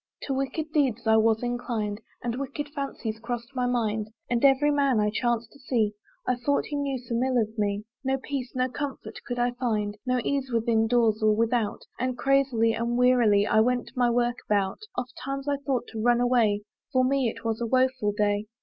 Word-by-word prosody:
To 275 - -2
wicked 275 +4 -2
deeds 255 -6 +1
I 220 0 +5
was 220 +1 +3
inclined, 230 -3 -2 0.2
And 240 +1 -2
wicked 285 +1 -4
fancies 275 -6 -4
cross'd 235 +2 -5
my 250 -1 0
mind, 220 -3 0 0.2
And 240 +1 +1
every 275 +2 +5
man 280 -5 +2
I 210 0 +2
chanc'd 235 0 -1
to 280 - -18
see, 230 -5 0 0.3
I 250 - +1
thought 280 +4 0
he 295 - -5
knew 280 -2 -1
some 240 -1 -3
ill 260 -1 +1
of 220 0 -1
me 205 -1 -1 0.2
No 265 0 +1
peace, 265 -1 -4
no 255 0 +2
comfort 275 +2 -6
could 245 - -3
I 245 0 +2
find, 215 -4 -2
No 250 0 +2
ease, 275 0 -1
within 225 -1 +2
doors 225 -2 +2
or 215 -1 +4
without, 230 -1 0 0.2
And 255 0 -1
crazily, 265 -5 +2
and 235 +1 -1
wearily, 240 -5 +4
I 220 - +3
went 245 +2 +1
my 245 -1 +3
work 240 0 +1
about. 200 -2 +1 0.2
Oft 250 0 -4
times 275 +1 -4
I 285 -1 +1
thought 270 -4 -1
to 220 - -5
run 240 +1 +4
away; 235 -4 +2 0.3
For 255 -1 +3
me 265 -2 +2
it 225 - -9
was 225 0 -1
a 235 - 0
woeful 255 -3 +2
day. 205 0 0
245 Hz, 205 wpm, -27 LUFS, 220-260 Hz, 0.3 s, I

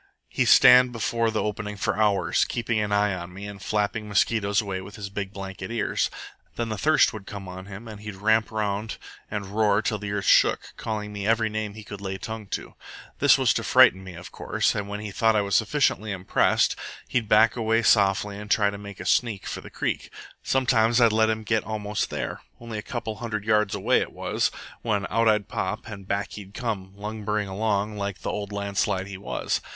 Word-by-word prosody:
He'd - - +1
stand 125 0 +8
before 115 0 0
the 110 -1 -1
opening 105 0 -4
for - - 0
hours, 105 -2 +2
keeping 115 -2 -1
an 105 -1 -1
eye 105 0 +2
on 90 -1 -6
me 100 +3 -8
and 100 -1 -8
flapping 105 +1 -1
mosquitoes 100 +1 +2
away 100 -4 -3
with 100 +2 -10
his 100 -2 -7
big 100 -1 -4
blanket 95 -1 -7
ears. 115 -2 0 0.5
Then 115 -1 -2
the 110 - -3
thirst 155 +6 +4
would 105 -3 -9
come 100 -2 -7
on 95 +1 -8
him 100 +3 -9
and 105 -2 -9
he'd 105 -2 -7
ramp 110 +3 +2
round 105 0 -2 0.3
and 105 -1 -3
roar 105 -2 +3
till 105 0 -1
the 100 0 -5
earth 100 -1 -2
shook, - - +3
calling 105 -1 -4
me 100 0 -4
every 110 -1 +2
name 110 -1 -3
he 110 - -9
could 105 -1 -9
lay 95 -1 -4
tongue 110 +1 -6
to. - - -5 0.5
This - - +6
was - - +3
to - - -2
frighten 95 +1 +5
me, 95 -2 -9
of 90 +1 -10
course; - - 0
and 100 -1 -4
when 105 +1 -4
he 105 -1 -6
thought 110 +2 +2
I 105 - +3
was 100 -2 0
sufficiently 110 +3 +1
impressed, 95 -1 +2 0.3
he'd 115 -4 -1
back 110 +1 +5
away 115 -1 +1
softly 100 -1 +3
and 105 0 -9
try 105 -1 +3
to 100 - -8
make 100 -1 -10
a - - -7
sneak 110 -5 +1
for - - -5
the - - -11
creek. - - -3 0.3
Sometimes 120 -3 +2
I'd 115 -2 +6
let 110 0 +3
him 110 0 -1
get 110 +1 +1
almost 105 -1 -2
there - - -4 0.2
only 115 -2 -6
a - - -4
couple 115 -1 -4
of - - -14
hundred 110 -3 -4
yards 105 -2 +2
away 110 +6 +2
it - - -4
was - - 0 0.3
when 105 -4 0
out 115 0 +2
I'd 105 -2 +2
pop 95 +4 -3
and 100 -3 -9
back 100 +1 -2
he'd 100 -1 -10
come, 100 -6 -4
lumbering 105 0 -3
along 105 +1 -1
like 100 -1 -4
the - - -2
old 105 -1 -4
landslide 100 -1 -1
he 95 -1 -8
was. 100 - -2
105 Hz, 215 wpm, -25 LUFS, 100-110 Hz, 0.5 s, stand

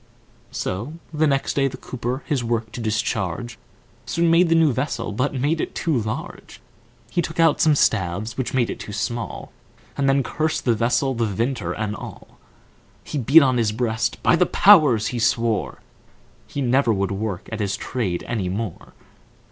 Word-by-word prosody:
So 110 +11 -4 0.2
the 155 0 +2
next 135 -1 0
day 140 -1 +2
the 130 -1 -6
Cooper 125 +1 -4
his 140 -6 -1
work 115 -1 -2
to 120 - -6
discharge, 110 0 -2 0.5
Soon 170 0 +1
made 170 +1 +4
the 165 - +4
new 160 -4 +4
vessel, 125 -4 -2
but 130 +7 -1
made 145 +5 0
it - - -5
too 165 -3 0
large; 110 -3 -5 0.5
He 175 - +1
took 165 0 -6
out 165 -3 +4
some 155 -2 +5
staves, 105 -2 0
which 130 - -3
made 125 -3 +1
it - - -7
too 105 - -7
small, 115 +2 -4 0.4
And 140 -1 +1
then 135 0 +3
cursed 155 +3 -2
the 120 - +4
vessel, 120 +4 +1
the 115 -2 0
Vintner 105 -3 -2
and 110 +1 -3
all. - - -11 0.6
He 150 - -4
beat 140 +6 +6
on 130 -2 +2
his 115 -3 +1
breast, 110 0 -1
"By - - +5
the 180 +1 +3
Powers!" 150 - +5
he 120 - -2
swore, 115 -1 0 0.7
He 140 - -4
never 130 0 +3
would 100 -2 0
work 100 -2 -4
at 110 - -4
his 100 -2 -1
trade 100 -9 -3
any 105 -6 -2
more. 100 -2 -5
120 Hz, 180 wpm, -22 LUFS, 110-140 Hz, 0.7 s, beat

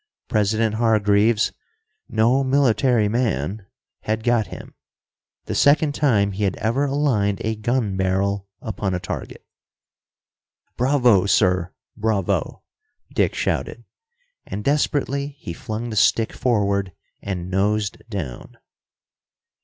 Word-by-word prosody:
President 110 +1 +1
Hargreaves, 110 -1 +3 0.6
"no 115 +5 +3
military 130 -4 +3
man," 105 - -1 0.3
had 110 +1 -2
got 120 -3 +2
him, - - -10 0.7
the - - -4
second 145 +1 +4
time 110 -10 +2
he 100 +2 -3
had 95 -2 +1
ever 120 +6 0
aligned 130 -9 +1
a 110 0 0
gun 110 -2 -1
barrel 95 +1 0 0.2
upon 100 -3 -2
a - - -2
target. - - -7 1.3
"Bravo, 125 -7 +3
sir, 90 -3 +2 0.2
bravo!" 105 -4 -1 0.5
Dick - - +1
shouted. - - -2 0.6
And 105 - -6
desperately 140 0 0
he 85 - -7
flung 115 +5 -5
the - - -4
stick 110 +2 +3
forward 100 -6 0 0.3
and 90 -2 -4
nosed 100 +2 0
down. 80 - -6
110 Hz, 110 wpm, -22 LUFS, 100-120 Hz, 1.3 s, second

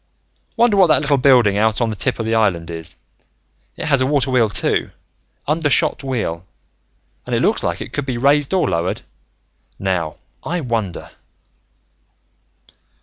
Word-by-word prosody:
"Wonder 230 -3 +3
what 190 -2 +6
that 155 - +4
little 145 -1 +2
building 120 -7 +4
out 110 0 +2
on 115 -2 0
the - - -4
tip 95 - -1
of 115 - -3
the 110 - -1
island 90 -7 0
is, 80 -1 -2 0.8
it - - -4
has 140 -3 +2
a 130 - +2
water 135 -2 +1
wheel 120 -4 +3
too. - - 0 0.6
Undershot 155 0 +2
wheel, 110 -11 -3 0.8
and - - -1
it - - 0
looks - - +2
like - - -2
it - - -8
could 145 -1 -3
be 125 -2 -2
raised 140 +3 +2
or 190 -2 +1
lowered. 85 +2 -2 0.7
Now, 90 -5 -2 0.3
I 175 +2 -2
wonder...." 115 - -4
125 Hz, 155 wpm, -19 LUFS, 100-145 Hz, 0.8 s, what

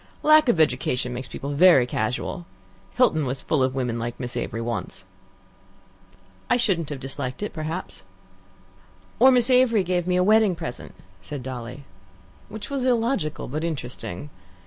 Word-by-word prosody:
Lack 305 -3 +6
of 180 - +2
education 125 -3 +1
makes 125 +1 -5
people 140 +2 -6
very 145 -3 +6
casual. 125 - -3 0.5
Hilton 235 -12 +3
was 130 0 -3
full 150 - +1
of 130 0 +1
women 125 -3 -2
like 120 +1 -5
Miss 125 -1 -5
Avery 115 - -3
once." 115 -1 -5 1.4
"I - - +4
shouldn't 185 - 0
have 145 -3 -5
disliked 135 +4 -5
it, 210 - -4
perhaps." 160 +3 -5 1.2
"Or 260 - +8
Miss 250 -1 +3
Avery 250 -5 +4
giving 180 0 -1
me 180 - +2
a 180 - +3
wedding 215 -1 +4
present," 160 -7 -7 0.3
said 145 -4 -7
Dolly. 125 +1 -7 0.7
Which 210 +4 -8
was 275 -2 -1
illogical 235 - 0
but 155 +4 -4
interesting. 140 - -5
155 Hz, 150 wpm, -24 LUFS, 125-210 Hz, 1.4 s, Or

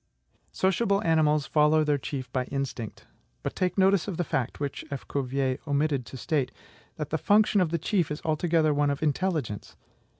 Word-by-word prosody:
Sociable 195 +2 +1
animals 155 -3 +3
follow 155 0 +4
their 150 -1 +1
chief 130 -3 -5
by 130 0 -1
INSTINCT; 135 -5 -5 0.4
but - - -3
take 180 0 -1
notice 195 -1 +4
of 190 -5 -3
the 175 - +1
fact 130 -6 -2
(which 145 -2 -3
F. 140 -3 -6
Cuvier 135 -1 -1
omitted 140 -3 0
to 130 - -8
state), 140 0 -1 0.4
that 150 -2 -5
the 160 - 0
function 205 +2 +4
of 175 - +2
the 170 - 0
chief 175 0 0
is 150 +1 -4
altogether 160 0 +2
one 145 0 +2
of 140 +2 -2
INTELLIGENCE. 150 - -1
150 Hz, 175 wpm, -27 LUFS, 140-170 Hz, 0.4 s, follow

